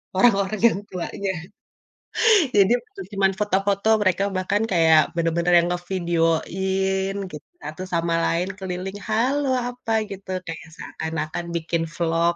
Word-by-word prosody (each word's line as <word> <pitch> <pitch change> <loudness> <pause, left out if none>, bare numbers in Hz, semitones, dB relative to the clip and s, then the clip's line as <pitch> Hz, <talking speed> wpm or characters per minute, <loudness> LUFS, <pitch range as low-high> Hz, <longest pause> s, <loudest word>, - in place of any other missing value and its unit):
orang-orang 200 -1 +3
yang 200 - 0
tuanya. 190 +2 -3 1.3
Jadi 200 +2 +5
bukan 400 -3 -11
cuman 195 -1 +3
foto-foto, 200 0 0
mereka 190 0 +2
bahkan 200 +3 0
kayak 160 -3 +5 0.2
bener-bener 170 +1 +1
yang 170 - +1
ngevideoin 190 +2 0 0.2
gitu, 150 -1 -10
satu 155 +5 -6
sama 170 0 +1
lain 175 +3 0
keliling, 190 +1 -5
"Halo, 265 +6 +1 0.2
apa," 245 -2 -6 0.2
gitu. 195 -1 -9 0.2
Kayak 165 0 -7
seakan-akan 160 +1 -4
bikin 165 0 -1
vlog 170 0 +1
185 Hz, 120 wpm, -23 LUFS, 170-195 Hz, 1.3 s, Jadi